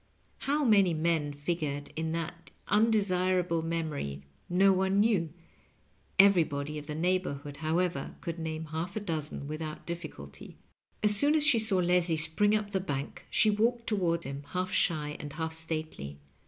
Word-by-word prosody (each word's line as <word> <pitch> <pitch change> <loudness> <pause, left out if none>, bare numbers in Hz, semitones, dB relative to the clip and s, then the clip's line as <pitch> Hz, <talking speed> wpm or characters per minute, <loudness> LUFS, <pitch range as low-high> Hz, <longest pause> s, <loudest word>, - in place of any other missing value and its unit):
How 295 0 +2
many 200 -7 +5
men 155 -2 +1
figured 145 -1 -3
in 160 0 -2
that 165 +1 -5 0.2
undesirable 185 -5 +2
memory, 155 - -3 0.3
no 190 +2 +5
one 190 +1 +2
knew; 200 -7 +2 0.9
everybody 155 -7 +4
of 150 - -11
the 150 - -4
neighborhood, 155 -5 -1
however, 160 -2 -1
could 170 0 -5
name 160 0 -4
half 170 +4 -3
a - - 0
dozen 155 -7 -4
without 155 0 -5
diffic^ulty. 155 - -8 0.5
As 210 0 +3
soon 290 +8 +4
as 305 -1 +3
she 260 -7 +5
saw 220 -3 +3
Leslie 175 -2 +2
spring 160 +7 +2
up 210 -1 -2
the 190 - +1
bank 145 -6 -5
she 215 - +4
walked 230 +3 +1
toward 170 -5 0
him, 140 +1 -5
half 185 0 -1
shy 150 -3 +1
and 145 -1 -7
half 160 0 -3
stately. 155 - -3
170 Hz, 155 wpm, -30 LUFS, 155-195 Hz, 0.9 s, many